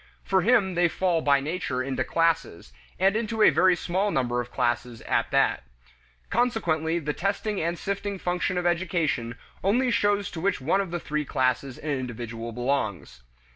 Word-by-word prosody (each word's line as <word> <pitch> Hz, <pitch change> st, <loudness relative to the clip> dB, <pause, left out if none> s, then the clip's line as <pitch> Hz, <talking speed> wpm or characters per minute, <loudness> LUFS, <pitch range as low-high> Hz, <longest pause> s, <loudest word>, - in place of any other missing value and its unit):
For 190 Hz, -1 st, +2 dB
him 205 Hz, -3 st, +3 dB
they 175 Hz, 0 st, +3 dB
fall 175 Hz, -1 st, 0 dB
by 140 Hz, -2 st, +3 dB
nature 140 Hz, -4 st, -2 dB
into 130 Hz, -1 st, -1 dB
classes, 160 Hz, -, 0 dB, 0.2 s
and 195 Hz, +2 st, +3 dB
into 220 Hz, -1 st, 0 dB
a -, -, +7 dB
very 185 Hz, 0 st, +4 dB
small 185 Hz, +4 st, -1 dB
number 125 Hz, -7 st, 0 dB
of 120 Hz, -, -8 dB
classes 120 Hz, -1 st, -1 dB
at -, -, 0 dB
that. -, -, +2 dB, 0.7 s
Consequently 170 Hz, -9 st, +1 dB
the 150 Hz, -3 st, -2 dB
testing 200 Hz, +3 st, -2 dB
and 170 Hz, +2 st, -1 dB
sifting 200 Hz, +1 st, -3 dB
function 180 Hz, 0 st, -1 dB
of 180 Hz, -, -1 dB
education 165 Hz, -9 st, 0 dB, 0.3 s
only 240 Hz, +6 st, +2 dB
shows 205 Hz, -3 st, +1 dB
to 160 Hz, -, -6 dB
which 200 Hz, +3 st, +1 dB
one 165 Hz, +9 st, +1 dB
of 175 Hz, -3 st, -4 dB
three 150 Hz, 0 st, -1 dB
classes 130 Hz, -1 st, -1 dB
an 150 Hz, -, -4 dB
individual 120 Hz, -3 st, -4 dB
belongs. 120 Hz, -, -2 dB
165 Hz, 165 wpm, -26 LUFS, 130-195 Hz, 0.7 s, a